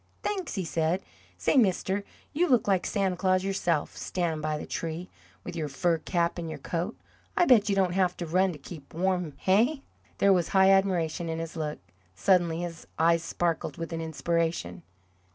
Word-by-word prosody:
"Thanks," 380 - -2
he 190 -3 -2
said. 165 +3 0 0.3
"Say, 90 - +2
mister, 195 -3 +2 0.3
you 350 +4 +2
look 245 -6 +3
like 190 -3 +2
Santa 195 -3 0
Claus 185 0 +2
yourself, 175 -5 0
standin' 165 -4 -2
by 155 0 -1
the - - -6
tree, 165 +2 -4 0.3
with - - -7
your 160 -2 -2
fur 165 +4 0
cap 170 0 0
and 165 -1 -4
your - - -5
coat. 175 +6 -3 0.4
I 350 - +5
bet 220 -8 +5
you 200 - +2
don't 185 -2 +2
have 185 -1 +1
to 175 - -4
run 185 +3 +2
to 160 - -8
keep 150 0 -11
warm, 180 -3 0
hey?" 240 +10 +2 0.3
There 200 0 +5
was 175 -3 +2
high 190 0 +5
admiration 175 -4 +1
in 160 - -2
his 165 +1 -5
look. 155 -2 -3 0.4
Suddenly 170 - +2
his 170 -2 -6
eyes 165 +1 +4
sparkled 170 0 -2
with 165 0 -5
an 165 - -3
inspiration. 160 - -1
175 Hz, 185 wpm, -28 LUFS, 165-190 Hz, 0.4 s, I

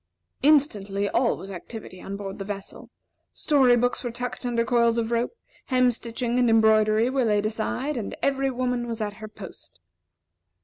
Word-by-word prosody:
Instantly 210 -9 +2
all 235 +3 +1
was 195 - -9
activity 185 0 -9
on 200 +1 -6
board 195 -1 -7
the - - -3
vessel. 200 0 -7 0.5
Story 265 -5 +4
books 245 +2 0
were 245 - -2
tucked 245 +1 -5
under 235 -1 0
coils 235 0 +3
of 230 0 -1
rope, 240 - -1 0.3
hem 255 -1 +3
stitching 235 +1 -2
and 245 -1 +3
embroidery 220 0 +4
were 260 0 +1
laid 210 -1 +1
aside, 240 +6 -2
and 220 - -5
every 275 -1 +1
woman 250 -1 -2
was 230 -1 -4
at 210 -1 -2
her 215 - -6
post. 205 - -12
235 Hz, 170 wpm, -25 LUFS, 215-250 Hz, 0.5 s, Story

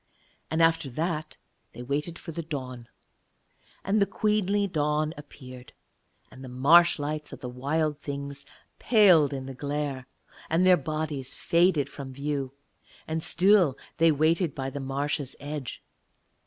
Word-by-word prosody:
And 160 +1 +2
after 165 -3 +2
that 155 +3 -3 0.4
they 120 - -8
waited 150 +6 -3
for - - -8
the 170 - -4
dawn. 130 -6 -7 0.9
And 205 +2 +1
the 200 - +3
queenly 205 -1 +1
dawn 155 -3 0
appeared, 130 -3 -12 0.6
and 130 - -12
the 130 - -8
marsh 160 +8 +5
lights 150 +1 -4
of - - -10
the 125 - -5
Wild 145 +4 -1
Things 140 -1 -6 0.4
paled 185 - +5
in 135 -2 -5
the 135 - -7
glare, 140 -1 -4 0.4
and 165 +3 +2
their 185 -1 +7
bodies 150 -3 -4
faded 170 -4 +2
from 135 -2 -9
view; 140 -1 -3 0.6
and 160 0 -2
still 185 -5 +3 0.2
they 165 0 +5
waited 155 +2 +1
by 135 0 -4
the 145 - -5
marsh's 140 +1 -3
edge. 145 -2 -6
150 Hz, 140 wpm, -27 LUFS, 135-165 Hz, 0.9 s, their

